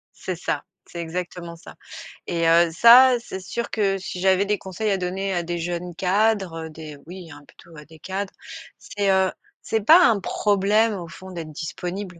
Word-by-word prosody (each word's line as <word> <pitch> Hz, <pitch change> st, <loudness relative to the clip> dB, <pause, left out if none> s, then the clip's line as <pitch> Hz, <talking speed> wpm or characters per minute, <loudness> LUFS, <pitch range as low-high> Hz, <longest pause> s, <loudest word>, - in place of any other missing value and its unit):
C'est 185 Hz, -, -5 dB
ça. -, -, -3 dB, 0.2 s
C'est 170 Hz, -, -9 dB
exactement 170 Hz, 0 st, -6 dB
ça 165 Hz, -, -13 dB, 0.5 s
et 165 Hz, -1 st, 0 dB
heu, 170 Hz, +1 st, +5 dB
ça 245 Hz, +7 st, +7 dB
c'est 190 Hz, -5 st, -8 dB
sûr 235 Hz, +5 st, -5 dB
que 200 Hz, -3 st, 0 dB
si 185 Hz, -1 st, -7 dB
j'avais 190 Hz, +1 st, +3 dB
des 205 Hz, -1 st, -1 dB
conseils 195 Hz, +3 st, -3 dB
à 195 Hz, -, +1 dB
donner 190 Hz, +2 st, -3 dB
à 175 Hz, -, 0 dB
des 175 Hz, +1 st, -4 dB
jeunes 175 Hz, +1 st, -4 dB
cadres, 190 Hz, -3 st, 0 dB
des 155 Hz, -1 st, -10 dB
oui, 175 Hz, -2 st, -10 dB
hein, 145 Hz, 0 st, -12 dB
plutôt 165 Hz, -, -18 dB
à 150 Hz, -1 st, -12 dB
des 160 Hz, 0 st, -16 dB
cadres. 190 Hz, +3 st, -5 dB, 0.5 s
C'est, 200 Hz, -1 st, -3 dB
heu, 190 Hz, 0 st, +2 dB, 0.3 s
c'est 220 Hz, -1 st, -1 dB
pas 335 Hz, -, +7 dB
un 220 Hz, -3 st, +3 dB
problème 210 Hz, +3 st, +1 dB
au 175 Hz, -3 st, -7 dB
fond 185 Hz, +3 st, -11 dB
d'être 165 Hz, -3 st, -7 dB
disponible. 180 Hz, +4 st, -6 dB
185 Hz, 185 wpm, -23 LUFS, 170-200 Hz, 0.5 s, ça